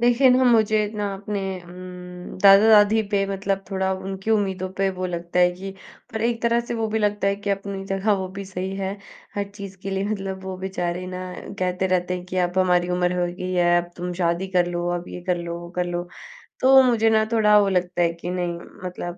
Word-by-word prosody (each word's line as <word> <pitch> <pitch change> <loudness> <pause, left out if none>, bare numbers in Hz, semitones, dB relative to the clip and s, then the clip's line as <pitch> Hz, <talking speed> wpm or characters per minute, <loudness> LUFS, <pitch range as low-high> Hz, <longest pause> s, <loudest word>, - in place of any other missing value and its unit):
देखिए 245 +2 +5
ना 255 +1 +4
मुझे 220 -3 +4 0.2
ना 205 -1 -2
अपने 200 +1 -4 0.2
उम, 180 0 -9
दादा-दादी 210 +2 +7
पे 200 -1 +2
मतलब 195 0 -2
थोड़ा 190 0 0
उनकी 190 +2 -5
उम्मीदों 190 -3 0
पे 195 - +2
वो 185 0 -3
लगता 170 0 -3
है 180 - +5
कि 190 +2 -7 0.4
पर 220 - -3
एक 230 0 0
तरह 235 0 +3
से 235 0 -5
वो 225 -1 -1
भी 220 - +3
लगता 205 -1 +1
है 200 - 0
कि 205 0 -4
अपनी 195 0 -3
जगह 195 +2 +1
वो 185 - -4
भी 200 - -5
सही 190 0 -4
है, 195 0 -3 0.4
हर 205 - -1
चीज़ 200 -1 -9
के 195 - -4
लिए 195 +1 -1
मतलब 195 -2 -3
वो 190 -1 -5
बेचारे 185 -1 -3
ना 185 0 -5 0.4
कहते 185 0 0
रहते 180 -1 0
हैं 180 - -8
कि, 185 - -5
"अब 180 0 +1
हमारी 180 -1 +3
उम्र 180 0 +1
हो 175 - +2
गई 185 0 -4
है, 175 -1 +3
अब 175 - -13
तुम 180 0 -4
शादी 170 +2 +1
कर 175 - +4
लो, 175 0 -1
अब 175 - -9
ये 180 - -7
कर 180 - +3
लो, 170 0 -5
वो 175 0 -9
कर 180 - +1
लो।" 175 0 -3 0.5
तो 265 +1 +8
मुझे 225 -1 +3
ना 220 0 +3
थोड़ा 210 -2 +5
वो 200 - +3
लगता 180 -1 0
है 170 -1 +2
कि 170 +1 -7
नहीं, 175 -2 -2 0.3
मतलब 175 -1 -5
190 Hz, 225 wpm, -23 LUFS, 180-205 Hz, 0.5 s, तो